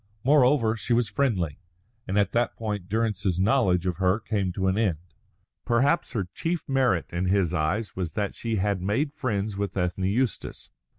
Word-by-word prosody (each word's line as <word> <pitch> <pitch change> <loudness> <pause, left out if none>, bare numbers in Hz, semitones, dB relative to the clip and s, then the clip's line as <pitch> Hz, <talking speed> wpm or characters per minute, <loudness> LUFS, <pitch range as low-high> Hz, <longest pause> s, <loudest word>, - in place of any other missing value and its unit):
Moreover, 130 -4 +4
she 115 +2 -1
was 115 -3 +2
friendly. 100 - 0 0.5
And 95 - -1
at 100 -2 +2
that 120 0 0
point 105 -5 -4
Durrance's 100 -4 0
knowledge 95 -5 +2
of 90 -3 -1
her 95 +2 +2
came 100 -5 -1
to 95 0 -2
an 95 0 +2
end. 100 -7 +1 0.7
Perhaps 135 +8 +1
her 100 -6 -2
chief 165 -1 -3
merit 130 -13 +1
in 90 +2 -1
his 90 -2 +2
eyes 90 +7 -1
was 90 -4 -3
that 105 -2 -2
she 115 -1 -3
had 100 -1 0
made 130 - 0
friends 105 -6 -2
with 100 0 -3
Ethne 90 +1 -1
Eustace. 115 +4 -2
105 Hz, 175 wpm, -26 LUFS, 95-115 Hz, 0.7 s, Moreover